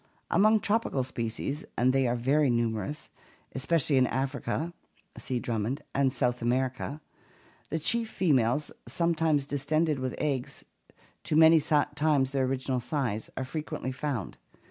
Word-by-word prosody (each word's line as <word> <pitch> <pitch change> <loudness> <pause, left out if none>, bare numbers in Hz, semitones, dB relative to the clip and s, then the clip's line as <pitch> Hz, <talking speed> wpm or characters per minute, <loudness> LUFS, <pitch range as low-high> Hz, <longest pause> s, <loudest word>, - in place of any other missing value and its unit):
Among 215 +2 +5
tropical 205 - 0
species 125 +4 -4
— - - -42
and 125 +2 +3
they 135 -1 +2
are 120 - +1
very 135 +4 +2
numerous, 115 +3 -1 0.4
especially 140 +1 +1
in 130 -1 +4
Africa 140 +6 -2 0.5
(see 125 -2 -2
Drummond) 115 +3 -2
and 135 -1 +2
South 125 -1 0
America 130 +4 -1 0.3
— - - -30
the 160 - -1
chief 225 +8 +1
females, 145 - +1 0.2
sometimes 165 -4 +1
distended 150 +2 0
with 130 -1 -3
eggs 135 -4 -2 0.6
to - - 0
many 160 0 +7
times 145 -2 +2
their 135 -1 +1
original 130 0 -1
size,1 120 -4 -2
are 130 - -2
frequently 150 -1 -4
found. 130 - -4
135 Hz, 140 wpm, -28 LUFS, 125-155 Hz, 0.6 s, many